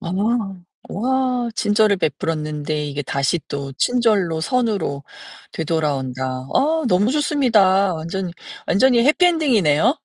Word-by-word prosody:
아. 170 - -6 0.8
와, 255 +2 -1
친절을 210 -1 +2
베풀었는데 155 -3 -3
이게 145 0 -4
다시 140 +5 -1
또 140 -1 -5
친절로 210 -10 +1
선으로 210 - -1 0.5
되돌아온다. 145 -5 -2 0.3
아 315 +3 +1
너무 205 +4 +2
좋습니다. 220 - +2
완전히, 170 +3 -5 0.3
완전히 240 +2 +3
해피 305 +6 +3
엔딩이네요. 245 - +2
195 Hz, 275 characters per minute, -20 LUFS, 155-250 Hz, 0.8 s, 완전히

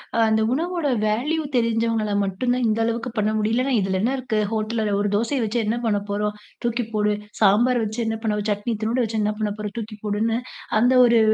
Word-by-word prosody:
அ, - - +1
அந்த 220 0 +2
உணவோட 335 +1 -1 0.2
வேல்யூ 260 +10 0
தெரிஞ்சவங்கள 230 -2 +1
மட்டும் 195 +6 -1
தான் 250 0 0
இந்த 220 +1 +1
அளவுக்கு 230 +2 -1
பண்ண 210 0 +2
முடியும். 215 +1 0
இல்லன்னா, 255 +2 +1
இதுல 190 -1 0
என்ன 235 +5 +1
இருக்கு? 245 -4 -2
ஹோட்டல்ல 220 +1 -1
உள்ள 210 - 0
ஒரு 205 - 0
தோசைய 235 +6 0
வச்சு 220 +2 -1
என்ன 215 +2 0
பண்ண 210 -2 +2
போறோம்? 210 +1 -1 0.3
தூக்கி 240 0 0
போடு. 210 0 +2 0.3
சாம்பார் 240 +5 +4
வச்சு 215 +2 -4
என்ன 225 0 -1
பண்ண, 210 -2 0
சட்னி 205 +3 -1
இத்துனூன்டு 225 +4 0
வச்சு 220 0 -3
என்ன 210 - +1
பண்ண 215 -1 -1
போறோம்? 210 -1 -5
தூக்கி 220 -1 -5
போடுன்னு, 220 +2 0 0.4
அந்த 245 +3 +4
ஒரு 235 -1 +5
225 Hz, 205 wpm, -23 LUFS, 210-240 Hz, 0.4 s, ஒரு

